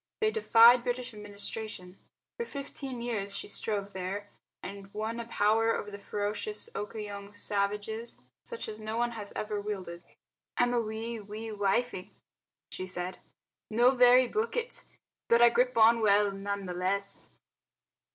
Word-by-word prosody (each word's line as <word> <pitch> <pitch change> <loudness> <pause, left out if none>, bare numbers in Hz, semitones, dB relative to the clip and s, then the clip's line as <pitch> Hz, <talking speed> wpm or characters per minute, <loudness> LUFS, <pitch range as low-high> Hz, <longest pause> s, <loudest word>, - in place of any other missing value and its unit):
They 435 -1 +2
defied 240 - +7
British 245 0 -2
administration. 205 -2 -5 0.4
For - - 0
fifteen 275 -3 -6
years 200 -4 -2
she - - -4
strove 205 -1 -3
there, 190 +2 -4 0.3
and 195 +1 -8
won 220 +2 -2
a 230 - -5
power 225 +1 +3
over 205 - -5
the 200 - -7
ferocious 210 - -3
Okoyong 205 -1 -6
savages 210 +3 -1 0.3
such 470 - -5
as 215 0 -7
no 215 +1 -3
one 240 0 +1
has 210 -3 -7
ever 210 -1 -2
wielded. 190 -5 -5 0.6
"I'm 245 0 +3
a 240 - +3
wee, 225 +1 -4
wee 215 +2 -7
wifie," 205 0 0 0.6
she 185 - -5
said, 180 0 -4 0.5
"no 240 +3 +5
very 250 0 +6
bookit, 465 - -2 0.4
but 235 - +5
I 240 0 +8
grip 250 0 +2
on 230 +1 +6
well 205 -1 +4
none 200 0 -4
the 180 - -4
less." 195 +2 -2
215 Hz, 145 wpm, -30 LUFS, 200-235 Hz, 0.6 s, I